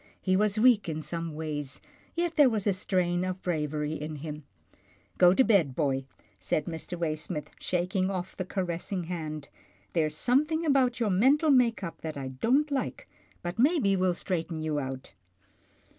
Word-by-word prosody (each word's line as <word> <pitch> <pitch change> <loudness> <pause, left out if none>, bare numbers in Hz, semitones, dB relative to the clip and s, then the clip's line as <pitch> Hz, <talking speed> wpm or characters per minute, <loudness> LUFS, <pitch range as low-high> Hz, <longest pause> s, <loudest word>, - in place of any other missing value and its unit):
He 185 -1 +1
was 210 +1 +2
weak 220 -6 +5
in 155 -1 -2
some 165 0 -4
ways, 145 -3 -4 0.4
yet 340 -1 -1
there 290 -4 +7
was 215 -4 -2
a 200 - +3
strain 180 -2 0
of 185 0 -4
bravery 150 -3 -1
in 155 0 -5
him. 150 0 -7 0.4
" - - -33
Go 180 0 +7
to 265 - +6
bed, 180 - +3
boy," 135 -3 0 0.3
said 145 +10 -1
Mr. 170 +1 -5
Waysmith, 155 -2 -3
shaking 185 +1 0
off 185 -1 -4
the 185 - -3
caressing 180 0 -3
hand. 155 -4 -5 0.2
" - - -34
There's 155 -3 +1
something 300 - +2
about 260 -4 +3
your 220 -4 +1
mental 275 - +4
make 240 -5 +3
up 170 - -6
that 155 -2 -5
I 135 -1 -4
don't 260 - +1
like, 280 - -2 0.4
but 175 +5 -4
maybe 265 - +4
we'll 185 -1 +2
straighten 165 -3 -3
you 155 -1 -1
out." 130 -1 -6
180 Hz, 175 wpm, -29 LUFS, 155-220 Hz, 0.4 s, there